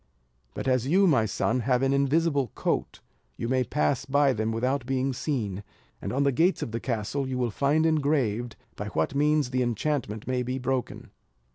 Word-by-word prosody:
But -, -, -4 dB
as 130 Hz, -1 st, +2 dB
you, 190 Hz, +7 st, +4 dB
my 130 Hz, -11 st, +3 dB
son, 130 Hz, -, 0 dB
have 125 Hz, +1 st, +1 dB
an 135 Hz, 0 st, +2 dB
invisible 140 Hz, 0 st, +2 dB
coat, -, -, -2 dB, 0.4 s
you 115 Hz, -, -3 dB
may 130 Hz, +1 st, +2 dB
pass 140 Hz, 0 st, 0 dB
by 140 Hz, 0 st, +3 dB
them 110 Hz, 0 st, -1 dB
without 125 Hz, +3 st, -1 dB
being 135 Hz, 0 st, 0 dB
seen; 115 Hz, -7 st, -3 dB, 0.4 s
and -, -, -4 dB
on 135 Hz, +3 st, +1 dB
the 140 Hz, -, +3 dB
gates 170 Hz, +9 st, +2 dB
of -, -, -5 dB
the 115 Hz, -, -2 dB
castle, 125 Hz, +3 st, -2 dB
you 130 Hz, -1 st, -3 dB
will 120 Hz, -2 st, 0 dB
find 145 Hz, +6 st, +2 dB
engraved, 140 Hz, -8 st, +1 dB, 0.2 s
by 105 Hz, -, -5 dB
what 80 Hz, +1 st, -1 dB
means 150 Hz, -2 st, +2 dB
the 130 Hz, 0 st, +1 dB
enchantment 120 Hz, -2 st, -2 dB
may 130 Hz, -1 st, 0 dB
be 125 Hz, +1 st, -2 dB
broken." 130 Hz, -1 st, -3 dB
130 Hz, 185 wpm, -27 LUFS, 120-140 Hz, 0.4 s, you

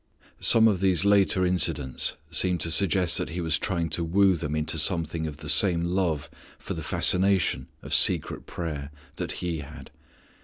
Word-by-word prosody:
Some 115 Hz, -1 st, +6 dB
of 100 Hz, -5 st, +1 dB
these 95 Hz, -1 st, +1 dB
later 100 Hz, -2 st, +3 dB
incidents 80 Hz, -7 st, 0 dB, 0.2 s
seem 90 Hz, +2 st, +3 dB
to 85 Hz, 0 st, 0 dB
suggest 90 Hz, -1 st, +2 dB
that -, -, -4 dB
he 85 Hz, +4 st, -6 dB
was 80 Hz, -2 st, -1 dB
trying 85 Hz, -5 st, -2 dB
to 85 Hz, +2 st, -2 dB
woo 95 Hz, +3 st, +2 dB
them 75 Hz, -2 st, -4 dB
into 80 Hz, +1 st, -2 dB
something 80 Hz, -1 st, 0 dB
of 75 Hz, -2 st, -8 dB
the -, -, -10 dB
same 85 Hz, -4 st, +3 dB
love 85 Hz, -4 st, -1 dB, 0.3 s
for -, -, -7 dB
the -, -, -6 dB
fascination 95 Hz, 0 st, 0 dB, 0.2 s
of -, -, -6 dB
secret -, -, +2 dB
prayer 75 Hz, -5 st, -6 dB, 0.3 s
that -, -, -4 dB
He 85 Hz, -3 st, -3 dB
had. 70 Hz, -, -11 dB
85 Hz, 170 wpm, -25 LUFS, 80-95 Hz, 0.3 s, Some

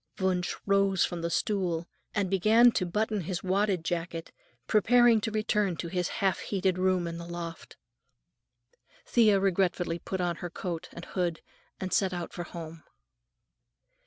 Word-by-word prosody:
Wunsch 185 Hz, -2 st, 0 dB
rose 195 Hz, -2 st, +3 dB
from 175 Hz, -1 st, -5 dB
the 170 Hz, -, -1 dB
stool 175 Hz, -3 st, -1 dB, 0.3 s
and 205 Hz, -2 st, +1 dB
began 215 Hz, +6 st, +5 dB
to 185 Hz, -5 st, -1 dB
button 210 Hz, +3 st, -1 dB
his 175 Hz, +1 st, -4 dB
wadded 190 Hz, -2 st, +1 dB
jacket, 170 Hz, -1 st, -3 dB, 0.3 s
preparing 235 Hz, +1 st, +5 dB
to 225 Hz, -, -1 dB
return 210 Hz, -4 st, 0 dB
to 170 Hz, -, -4 dB
his 180 Hz, 0 st, -1 dB
half 195 Hz, -4 st, 0 dB
heated 190 Hz, -2 st, -1 dB
room 185 Hz, -1 st, +2 dB
in 170 Hz, 0 st, -5 dB
the 170 Hz, -, -8 dB
loft. 170 Hz, -1 st, -7 dB, 1.3 s
Thea 215 Hz, -4 st, +4 dB
regretfully 180 Hz, -3 st, +1 dB
put 190 Hz, +2 st, -4 dB
on 175 Hz, -2 st, -1 dB
her 175 Hz, -, -5 dB
cloak 170 Hz, -1 st, -5 dB
and 170 Hz, -, -9 dB
hood 175 Hz, -3 st, -2 dB, 0.4 s
and 185 Hz, -1 st, -3 dB
set 190 Hz, -2 st, +2 dB
out 175 Hz, -1 st, -5 dB
for 175 Hz, -, -5 dB
home. 165 Hz, -2 st, -9 dB
185 Hz, 155 wpm, -29 LUFS, 170-200 Hz, 1.3 s, began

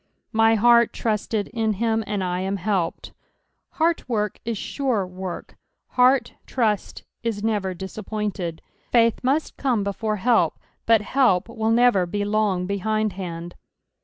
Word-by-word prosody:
" -, -, -53 dB
My 225 Hz, 0 st, +5 dB
heart 235 Hz, +1 st, +5 dB
trutUd 215 Hz, -1 st, -1 dB
in 220 Hz, -1 st, 0 dB
him, 225 Hz, +2 st, 0 dB
and 205 Hz, -2 st, -1 dB
I 180 Hz, 0 st, -1 dB
am 190 Hz, +1 st, -1 dB
helped." 190 Hz, -2 st, -2 dB, 0.6 s
Heart 330 Hz, -4 st, 0 dB
work 210 Hz, -3 st, -1 dB
is 230 Hz, -1 st, -2 dB, 0.2 s
aurs 240 Hz, -9 st, +1 dB
work; 185 Hz, 0 st, -7 dB, 0.3 s
heart 250 Hz, -1 st, +3 dB
truiit 220 Hz, -5 st, -1 dB, 0.2 s
18 220 Hz, -2 st, -2 dB
never 200 Hz, -4 st, -1 dB
disappointed. 190 Hz, -2 st, -4 dB, 0.3 s
Faith 230 Hz, -2 st, +4 dB
must 280 Hz, +5 st, 0 dB
come 245 Hz, -7 st, +1 dB
before 210 Hz, +2 st, -2 dB
help, 210 Hz, -5 st, +2 dB, 0.3 s
but 225 Hz, -2 st, +5 dB
help 210 Hz, -5 st, +2 dB
will 225 Hz, -1 st, -2 dB
never 230 Hz, -6 st, +4 dB
be 205 Hz, +4 st, -2 dB
lon^ 205 Hz, -3 st, +1 dB
behindhand. 190 Hz, -4 st, -2 dB
215 Hz, 135 wpm, -23 LUFS, 190-230 Hz, 0.6 s, My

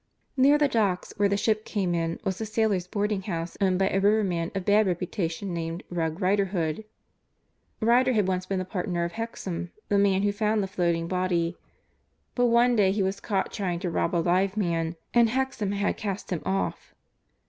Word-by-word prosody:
Near 280 Hz, +2 st, +5 dB
the 295 Hz, -1 st, +3 dB
docks 205 Hz, -8 st, 0 dB
where 200 Hz, 0 st, +3 dB
the 200 Hz, -, +1 dB
ship 215 Hz, +1 st, +1 dB
came 190 Hz, -6 st, -1 dB
in 165 Hz, -1 st, -1 dB
was 190 Hz, +2 st, -2 dB
a -, -, -1 dB
sailors' 210 Hz, -4 st, 0 dB
boarding 205 Hz, +1 st, -1 dB
house 170 Hz, -3 st, -4 dB
owned 185 Hz, -2 st, +3 dB
by 190 Hz, 0 st, +2 dB
a 195 Hz, -, +1 dB
riverman 195 Hz, -5 st, +2 dB
of 190 Hz, -2 st, -3 dB
bad 210 Hz, 0 st, +4 dB
reputation 180 Hz, 0 st, -2 dB
named 165 Hz, 0 st, -4 dB
"Rogue" 165 Hz, -1 st, -2 dB
Riderhood. 190 Hz, -2 st, 0 dB, 1.0 s
Riderhood 245 Hz, +3 st, +4 dB
had 210 Hz, -3 st, +2 dB
once 185 Hz, -1 st, -1 dB
been 195 Hz, -, -1 dB
the 185 Hz, -, -2 dB
partner 180 Hz, -2 st, -2 dB
of 170 Hz, -, -2 dB
Hexam, 190 Hz, -6 st, -5 dB, 0.2 s
the 200 Hz, -, +3 dB
man 195 Hz, -1 st, +3 dB
who 205 Hz, -, +2 dB
found 210 Hz, 0 st, 0 dB
the -, -, -2 dB
floating 170 Hz, -3 st, 0 dB
body, 175 Hz, -1 st, 0 dB, 0.8 s
but 245 Hz, -1 st, +2 dB
one 240 Hz, +1 st, +4 dB
day 200 Hz, -4 st, +4 dB
he 200 Hz, 0 st, 0 dB
was 190 Hz, +1 st, -1 dB
caught 195 Hz, -3 st, -2 dB
trying 185 Hz, -5 st, -2 dB
to 180 Hz, -3 st, -2 dB
rob 170 Hz, +1 st, 0 dB
a -, -, +3 dB
live 190 Hz, +3 st, +2 dB
man 165 Hz, -4 st, 0 dB, 0.2 s
and 235 Hz, -1 st, +5 dB
Hexam 260 Hz, -5 st, -1 dB
had 200 Hz, 0 st, 0 dB
cast 200 Hz, -2 st, -4 dB
him 175 Hz, -, -1 dB
off. 195 Hz, 0 st, -2 dB
195 Hz, 190 wpm, -26 LUFS, 175-210 Hz, 1.0 s, Near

